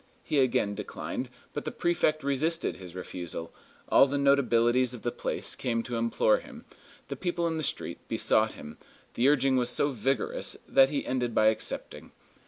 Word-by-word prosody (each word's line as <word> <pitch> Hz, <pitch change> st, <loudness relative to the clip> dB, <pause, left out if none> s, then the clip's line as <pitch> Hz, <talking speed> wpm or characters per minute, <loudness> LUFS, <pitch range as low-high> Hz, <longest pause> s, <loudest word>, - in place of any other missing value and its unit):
He 150 Hz, -, 0 dB
again 120 Hz, -6 st, +2 dB
declined; 105 Hz, 0 st, -5 dB, 0.2 s
but -, -, -4 dB
the -, -, -4 dB
prefect 155 Hz, -3 st, +1 dB
resisted 155 Hz, +5 st, 0 dB
his 90 Hz, -2 st, -11 dB
refusal, 90 Hz, -2 st, -6 dB, 0.3 s
all 135 Hz, -, +6 dB
the 140 Hz, +1 st, -1 dB
notabilities 125 Hz, -3 st, +3 dB
of 115 Hz, -, -12 dB
the 120 Hz, -, 0 dB
place -, -, -3 dB
came 115 Hz, -2 st, -1 dB
to 120 Hz, 0 st, -5 dB
implore 300 Hz, -, +2 dB
him, -, -, -12 dB, 0.4 s
the -, -, -4 dB
people 175 Hz, -2 st, -2 dB
in 165 Hz, -1 st, -1 dB
the -, -, -2 dB
street -, -, -2 dB
besought -, -, +2 dB
him; 75 Hz, +1 st, -11 dB, 0.3 s
the 125 Hz, +4 st, +3 dB
urging 135 Hz, -2 st, +3 dB
was 125 Hz, -1 st, +1 dB
so 145 Hz, +4 st, 0 dB
vigorous 130 Hz, 0 st, -1 dB
that 135 Hz, 0 st, +5 dB
he 145 Hz, -1 st, -2 dB
ended 125 Hz, -3 st, -1 dB
by 110 Hz, 0 st, +5 dB
accepting. 110 Hz, -, -4 dB
130 Hz, 175 wpm, -28 LUFS, 115-145 Hz, 0.4 s, all